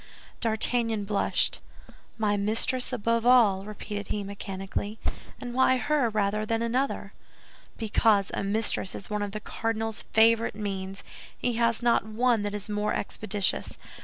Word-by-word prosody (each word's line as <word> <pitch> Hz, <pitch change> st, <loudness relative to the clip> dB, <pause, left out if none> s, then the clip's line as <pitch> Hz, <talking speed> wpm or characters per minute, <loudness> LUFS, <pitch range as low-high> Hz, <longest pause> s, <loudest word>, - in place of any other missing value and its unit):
D'Artagnan 225 Hz, -1 st, 0 dB
blushed. 200 Hz, 0 st, +1 dB, 0.6 s
"My 210 Hz, -2 st, +2 dB
mistress 220 Hz, +6 st, +1 dB
above 230 Hz, -1 st, +1 dB
all," 225 Hz, -6 st, +5 dB
repeated 205 Hz, -1 st, -6 dB
he, 205 Hz, -, -2 dB
mechanically; 200 Hz, +1 st, -5 dB, 0.4 s
"and 245 Hz, -1 st, -6 dB
why 260 Hz, 0 st, +4 dB
her 290 Hz, -2 st, +1 dB
rather 210 Hz, 0 st, 0 dB
than 225 Hz, +1 st, 0 dB
another?" 255 Hz, +4 st, -1 dB, 0.6 s
"Because 215 Hz, -2 st, +3 dB
a -, -, -1 dB
mistress 200 Hz, -1 st, 0 dB
is 200 Hz, -, -8 dB
one 210 Hz, 0 st, -1 dB
of 205 Hz, -1 st, -2 dB
the 215 Hz, -, -4 dB
cardinal's 225 Hz, 0 st, -2 dB
favorite 225 Hz, 0 st, +4 dB
means; 195 Hz, -2 st, -4 dB, 0.3 s
he 245 Hz, -, 0 dB
has 230 Hz, 0 st, +1 dB
not 235 Hz, -4 st, +4 dB
one 225 Hz, +2 st, +1 dB
that 205 Hz, 0 st, -2 dB
is 205 Hz, 0 st, -3 dB
more 210 Hz, 0 st, -1 dB
expeditious. 205 Hz, -1 st, -1 dB
215 Hz, 140 wpm, -27 LUFS, 205-230 Hz, 0.6 s, all